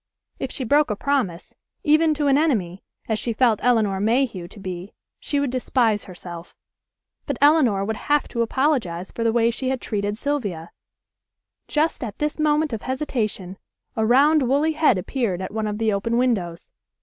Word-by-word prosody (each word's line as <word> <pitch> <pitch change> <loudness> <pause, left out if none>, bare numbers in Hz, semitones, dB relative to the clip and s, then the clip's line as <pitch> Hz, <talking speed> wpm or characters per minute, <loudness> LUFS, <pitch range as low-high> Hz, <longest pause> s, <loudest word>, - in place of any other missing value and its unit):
If 265 - -3
she 265 - -3
broke 290 +5 +3
a 210 - -1
promise, 220 -9 -2 0.3
even 310 0 +4
to 295 0 -1
an 275 -1 +4
enemy, 215 - 0 0.2
as 220 -1 0
she 230 +1 -2
felt 225 -2 +2
Elinor 220 -6 +2
Mayhew 220 -4 0
to 200 +3 -14
be, 185 0 -7 0.3
she 285 - -1
would 280 -3 -1
despise 240 -4 +1
herself. 175 -2 -10 0.7
But 280 -4 -2
Elinor 270 -10 +4
would 220 +1 -3
have 295 0 +1
to 235 - -2
apologize 230 - 0
for 230 - -4
the 230 - +2
way 230 0 +2
she 255 +2 -3
had 265 -1 -1
treated 205 -2 -3
Sylvia. 215 - -3 1.0
Just 310 -1 0
at 215 -4 -6
this 300 +1 -2
moment 300 -2 +1
of 225 - -3
hesitation 225 -9 -3 0.4
a 220 - 0
round 285 +7 +4
woolly 280 +5 +2
head 305 -8 +3
appeared 195 -1 -2
at 190 +1 -6
one 220 -1 -2
of 210 0 -3
the 220 -1 +1
open 230 +4 -1
windows. 200 -10 -1
235 Hz, 175 wpm, -23 LUFS, 200-280 Hz, 1.0 s, even